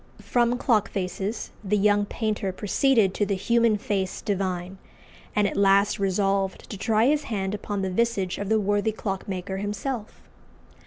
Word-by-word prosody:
From 240 0 +2
clock 220 -5 +2
faces 195 +3 -3
the 210 +1 +1
young 205 0 +3
painter 210 -4 -2
proceeded 210 +1 +2
to 205 - 0
the 200 -1 0
human 230 +2 +2
face 195 -2 -2
divine, 190 -2 -2 0.6
and 210 -1 +3
at - - -4
last 200 +1 +4
resolved 195 0 0
to - - -4
try 220 +1 +2
his 295 +2 +2
hand 195 -3 -2
upon 205 -1 -3
the 190 - -1
visage 200 -3 0
of 200 0 -3
the 220 0 +3
worthy 205 +1 +1
clockmaker 190 -2 -4
himself. 210 +3 -4
205 Hz, 155 wpm, -25 LUFS, 195-220 Hz, 0.6 s, last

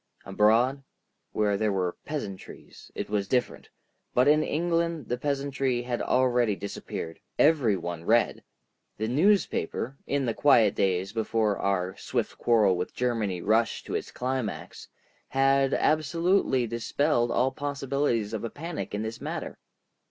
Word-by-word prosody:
Abroad, 115 +7 +3 0.5
where 105 -1 +1
there 110 0 +1
were 90 -2 -1
peasantries, 105 -11 -7
it - - -4
was 100 -2 -1
different, 125 +3 -1 0.5
but 125 +2 +4
in 150 +1 +5
England 170 -2 -1
the 125 - 0
peasantry 135 -3 -1
had 120 -1 -3
already 125 -4 +2
disappeared. 85 -3 -6 0.2
Every 140 -10 +4
one 85 -1 -5
read. 115 +3 +2 0.5
The 110 - -2
newspaper, 145 - +1
in 140 -1 0
the 115 - 0
quiet 115 -8 +4
days 95 +1 0
before 110 -2 0
our 95 -1 -1
swift - - -3
quarrel 110 -6 +4
with 90 - -4
Germany 110 -8 -1
rushed 110 +2 +1
to - - -6
its - - -3
climax, 125 -4 -4 0.4
had 135 0 +3
absolutely 155 -3 +2
dispelled 120 +2 0
all 125 +3 +2
possibilities 140 -5 -1
of 110 - -3
a 115 - -2
panic 160 -6 -5
in 105 - -2
this 110 +1 -6
matter. - - -5
120 Hz, 135 wpm, -27 LUFS, 105-140 Hz, 0.5 s, in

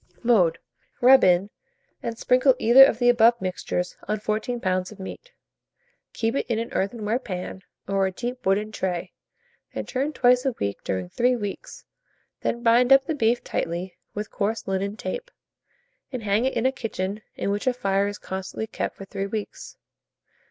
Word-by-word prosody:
Mode. 195 -9 +4 0.4
Rub 260 +2 +7
in, 185 +3 +3 0.5
and 230 -1 -4
sprinkle 255 +2 +4
either 250 +3 +8
of 270 - +4
the 245 0 +2
above 235 0 +5
mixtures 185 -1 -3
on 215 - -1
14 215 +3 -2
lbs. 185 -2 -1
of 210 - -13
meat. - - -9 0.8
Keep 225 +3 -1
it - - -2
in 230 - 0
an 230 +1 -4
earthenware 215 +3 -1
pan, 190 -4 -6 0.3
or 195 0 +1
a - - -3
deep 245 +6 -5
wooden 205 +3 +1
tray, 180 -3 -3 0.6
and - - -4
turn 275 +3 -1
twice 250 -3 +4
a 265 - 0
week 100 0 -3
during 95 -1 -2
3 250 - +1
weeks; 205 -4 -6 0.5
then 235 0 -2
bind 240 +2 +4
up 270 0 +7
the 320 - -1
beef 240 -4 +1
tightly 175 +2 -3 0.2
with 210 0 -4
coarse 220 +1 -2
linen 195 +2 -2
tape, - - -5 0.8
and 255 -4 -5
hang 210 +4 +1
it 265 - 0
in 230 - 0
a 260 - +4
kitchen 210 -5 -4
in 200 - -2
which 205 +5 -2
a - - +5
fire 200 -4 0
is 205 0 -5
constantly 190 +3 -5
kept, - - -4
for 195 - -8
3 195 0 -4
weeks. 210 0 -6
215 Hz, 175 wpm, -25 LUFS, 195-245 Hz, 0.8 s, either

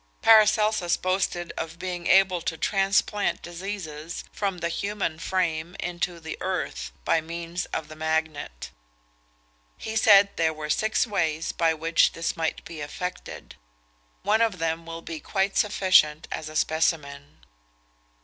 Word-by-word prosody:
Paracelsus 215 -4 +5
boasted 185 -2 -1
of 165 +1 -5
being 180 -1 -4
able 190 -2 +4
to 160 0 -3
transplant 195 +3 +1
diseases 170 -3 -6
from 195 -3 -2
the 170 -1 -2
human 195 -2 -2
frame 175 -2 -1
into 175 0 -3
the 160 -1 -6
earth, 65 0 -3
by 165 - +3
means 170 +2 -5
of 160 - -4
the 155 - -10
magnet. 160 - -3 1.1
He 220 - -6
said 205 -3 +6
there 160 -1 +1
were 150 0 -3
six 220 +2 +1
ways 165 -7 -1
by 165 -1 +1
which 165 +1 +3
this 165 0 -2
might 160 -1 -2
be 165 -3 -8
effected. 180 +5 -6 0.7
One 215 +3 +3
of 225 -5 +2
them 165 0 -2
will 165 0 -7
be 160 -2 -6
quite 195 +3 -1
sufficient 185 -7 +3
as 155 - -4
a 155 - -11
specimen. 150 -3 -1
170 Hz, 140 wpm, -26 LUFS, 160-195 Hz, 1.1 s, said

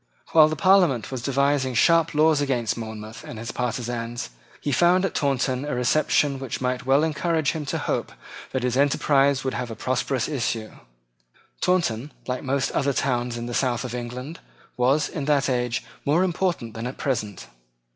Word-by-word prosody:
While 155 -2 +7
the 155 - -2
Parliament 165 - +3
was 130 -2 -4
devising 140 0 +1
sharp 165 +5 +4
laws 155 -1 +4
against 125 -6 0
Monmouth 110 -1 -7
and 115 - -8
his 115 +1 -5
partisans, 120 - -3 0.3
he 145 - -2
found 180 +6 +4
at - - -2
Taunton 130 -2 0
a 145 -3 -3
reception 140 +2 +2
which 135 -3 -4
might 125 0 -2
well 135 +3 +4
encourage 160 -1 0
him 155 -3 -5
to - - -1
hope - - -2 0.4
that 130 -2 -2
his 125 -1 0
enterprise 140 -1 +3
would 130 - -2
have 125 - -3
a 115 - -6
prosperous 130 +2 -1
issue. 115 -6 -2 0.9
Taunton, 150 -8 +1
like 125 0 -3
most 135 0 0
other 140 -1 +1
towns 120 -2 -1
in 120 - -4
the 120 - -5
south 125 -1 0
of 125 -2 -5
England, 125 +5 -6 0.4
was, 135 +5 +2
in 145 -4 -5
that 145 -3 +2
age, 125 -2 -1 0.2
more 155 +6 +3
important 175 - -1
than 115 +2 -4
at 125 - -7
present. 105 -8 -3
130 Hz, 175 wpm, -24 LUFS, 120-150 Hz, 0.9 s, While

